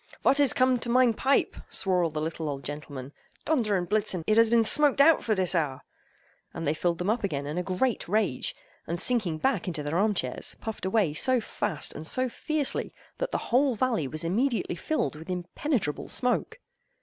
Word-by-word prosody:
"Vot 275 - +4
is 285 -2 +5
cum'd 255 -2 +2
to 240 - -4
mein 250 -1 +4
pipe?" 270 +5 +1
swore 185 -3 +1
all 165 - +1
the 155 0 -4
little 160 0 -3
old 140 -1 -5
gentlemen, 145 -1 -7 0.3
"Donder 230 -10 +1
and 175 -1 -3
Blitzen; 205 -4 0
it 215 - +2
has 230 0 +5
been 230 0 +4
smoked 285 +4 +4
out 305 +2 +6
for 220 - +1
dis 185 -2 +1
hour!"—and 155 +1 -6
they 145 - +2
filled 170 +1 -1
them 180 +5 0
up 230 0 -2
again 145 -8 -2
in 150 +4 -3
a - - 0
great 195 +6 -1
rage, 200 -8 0 0.3
and 170 +1 -3
sinking 195 -7 +1
back 245 - 0
in 180 - -2
their 150 +2 -2
arm 210 0 +2
chairs, 130 -8 -2
puffed 220 -4 -5
away 190 -6 +1
so 255 - +3
fast 205 -7 -2
and 155 - -6
so 255 +7 0
fiercely 305 +2 -1 0.2
that - - -1
the - - -1 0.2
whole 265 0 +4
valley 225 - 0
was 155 +4 -2
immediately 225 +4 0
filled 170 - -2
with 160 +4 -11
impenetrable 180 - -2
smoke. 250 -1 -1
195 Hz, 195 wpm, -27 LUFS, 160-250 Hz, 0.3 s, out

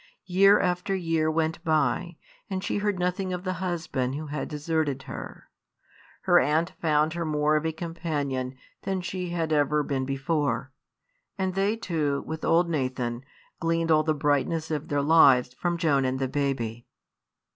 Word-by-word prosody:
Year 195 +3 +5
after 180 +2 0
year 165 -3 0
went 160 +1 -1
by, 165 +1 0 0.3
and 190 -1 -3
she - - -1
heard 205 -1 0
nothing 180 +1 -1
of 180 0 -4
the 185 -1 -1
husband 160 -8 -2
who 155 +2 -5
had 150 0 -4
deserted 150 -3 -1
her. - - -9 0.7
Her - - +5
aunt 155 +5 +1
found 155 -1 +2
her 170 0 -2
more 150 -1 +1
of 155 +1 +1
a - - 0
companion 150 -6 -3 0.3
than 190 -1 -2
she 180 0 -4
had 165 -2 -1
ever 150 0 +2
been 135 -2 -2
before; 135 -2 -1 0.7
and 190 -1 -1
they 195 +3 +1
two, 155 -10 -1
with 160 0 -6
old 170 +1 +3
Nathan, 130 -6 -2 0.4
gleaned 165 -1 0
all 155 -1 +5
the 155 0 0
brightness 150 +3 0
of 150 -2 -2
their 145 -1 0
lives 140 -5 +5
from 175 +6 -1
Joan 150 -5 +2
and 130 0 0
the 135 0 -1
baby. 125 -5 -2
155 Hz, 165 wpm, -26 LUFS, 140-175 Hz, 0.7 s, Year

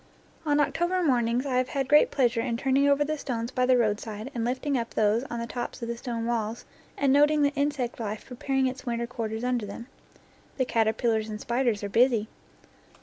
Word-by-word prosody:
On 290 0 +3
October 345 +5 +1
mornings 245 -3 +1
I 260 -2 0
have 255 0 +1
had 270 -2 -1
great 295 +2 +6
pleasure 240 -3 +1
in 230 -1 -2
turning 275 +3 +2
over 285 +1 +4
the 305 0 -3
stones 235 -3 -3
by 255 -1 +1
the 255 -1 +5
roadside 215 +1 -2
and 235 - -2
lifting 260 +4 -1
up 235 -2 -3
those 215 +3 +2
on 240 -3 -5
the 235 - -3
tops 240 +1 -5
of - - -3
the 235 - -3
stone 230 -1 -4
walls 230 -1 -2 0.3
and 275 -1 +3
noting 295 +1 +4
the 285 0 +2
insect 280 -4 -1
life 215 -1 -4
preparing 265 +1 -1
its 255 0 -3
winter 235 -2 -2
quarters 230 -2 -4
under 245 -4 -1
them. 215 +4 -8 0.7
The 260 - +1
caterpillars 220 -1 +1
and 210 0 -5
spiders 235 -3 0
are 200 - -3
busy. 230 -1 +3
245 Hz, 205 wpm, -27 LUFS, 230-270 Hz, 0.7 s, great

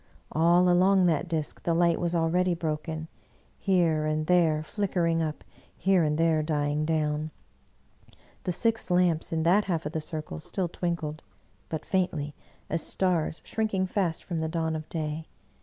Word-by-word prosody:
All 170 +3 +4
along 185 +1 +5
that 165 0 +1
disk 160 -3 -3
the 170 - 0
light 170 -1 +3
was 175 0 0
already 175 +2 +2
broken, 160 -1 -3 0.5
here 165 -5 +2
and 155 0 0
there 160 -3 +3
flickering 170 -3 0
up, 155 -2 -3 0.3
here 190 -1 +3
and 150 -1 +1
there 165 -1 +3
dying 150 -1 0
down; 155 -1 0 1.1
the 180 - -1
six 225 +6 0
lamps 175 -3 +2
in 160 -1 0
that 190 +5 +4
half 170 -4 -1
of 150 - -3
the 160 -1 -2
circle 155 - -5
still 180 - -2
twinkled, 165 -3 -3 0.5
but 160 -1 -4
faintly, 165 -6 -1 0.3
as 165 +1 -1
stars 175 -4 0
shrinking 215 -4 0
fast 180 -3 -1
from 170 -3 -3
the 160 0 -1
dawn 160 -1 -1
of 155 0 -6
day. 155 -1 -3
165 Hz, 155 wpm, -28 LUFS, 155-180 Hz, 1.1 s, along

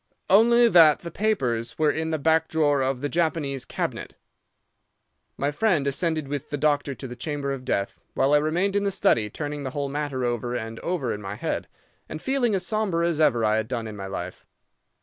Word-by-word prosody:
"'Only 235 +4 +6
that 165 -8 +6
the 170 - -7
papers 125 - -1
were 155 -1 +3
in 160 +2 -2
the 160 - 0
back 160 +2 +2
drawer 145 -3 +2
of 130 -1 -1
the 145 - 0
Japanese 155 -5 -1
cabinet.' - - -4 1.2
"My 140 +1 0
friend 170 -3 +1
ascended 155 +2 0
with 145 -1 -5
the 145 - -2
doctor 145 -1 +1
to 130 - -7
the 125 - -8
chamber 140 +2 -3
of 135 -2 -5
death, 100 -5 -2 0.2
while 140 +2 +2
I 150 - +6
remained 175 +6 0
in 205 - +2
the 200 - +1
study, 185 - +2
turning 145 +5 -5
the 135 - -3
whole 140 -1 -1
matter 140 -3 -2
over 120 0 -2
and 115 -1 -5
over 160 -9 -2
in 105 - -6
my 95 0 -5
head, - - -3 0.4
and 155 - -5
feeling 245 -1 +1
as 185 -1 -2
sombre 190 -6 0
as 160 -2 0
ever 120 -7 +3
I 110 0 +2
had 110 0 -1
done 120 -2 -3
in 110 -1 -7
my 100 -1 -6
life. 90 -2 -6
145 Hz, 210 wpm, -25 LUFS, 125-170 Hz, 1.2 s, Only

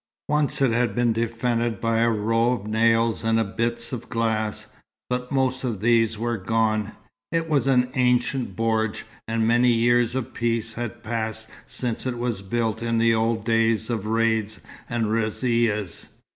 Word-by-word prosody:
Once 150 -2 +1
it 130 - +3
had 120 +1 +1
been 120 -2 +2
defended 115 -1 -1
by 115 0 +1
a 115 0 +3
row 115 +2 +1
of 110 -5 -5
nails 115 0 +2
and 115 -3 0
bits 115 +1 -1
of 120 - -6
glass, 110 -1 -1 0.5
but 125 0 -2
most 130 -1 0
of 115 -6 -2
these 115 0 +2
were 120 +1 -1
gone. 110 +1 0 0.4
It 165 0 0
was 145 -4 +1
an 125 -1 +3
ancient 125 -3 +1
bordj, 110 0 0 0.2
and 115 0 0
many 120 +2 +4
years 120 +1 +2
of 130 -3 -3
peace 115 -1 -1
had 120 -2 -6
passed 110 -1 -3 0.2
since 125 0 -3
it 125 -2 -2
was 120 -4 -2
built 110 +2 -2
in 115 0 0
the 115 0 +4
old 110 0 0
days 115 0 +2
of 110 -3 -2
raids 110 -1 0 0.3
and 115 -2 0
razzias. 110 -2 0
115 Hz, 160 wpm, -24 LUFS, 110-120 Hz, 0.5 s, many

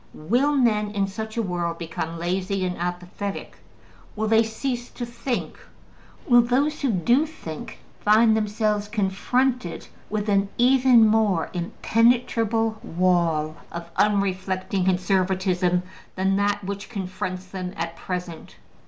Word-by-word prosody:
Will 245 - +1
men 215 -6 +2
in 205 -1 0
such 220 +3 -6
a 230 - +1
world 175 -3 -2
become 165 0 -5
lazy 185 +3 -1
and 180 -1 -2
apathetic? 180 +3 -5 0.6
Will 220 0 -1
they 220 +1 +5
cease 240 +2 -3
to 240 - -6
think? 240 +1 -4 0.7
Will 240 -2 +7
those 275 +6 0
who 275 -4 +1
do 240 - +2
think 160 - -8 0.2
find 220 +1 +5
themselves 210 -1 0
confronted 215 +2 -1 0.2
with 210 0 -2
an 200 -1 +2
even 250 -2 +6
more 215 -6 +2
impenetrable 225 +3 +1
wall 165 -3 +1
of 170 0 -7
unreflecting 190 -2 0
conservatism 185 -1 +1 0.3
than 190 +1 +1
that 205 0 0
which 200 +1 -5
confronts 185 -3 -4
them 185 -1 -6
at 170 0 -3
present? 175 -1 -6
200 Hz, 125 wpm, -24 LUFS, 180-225 Hz, 0.7 s, Will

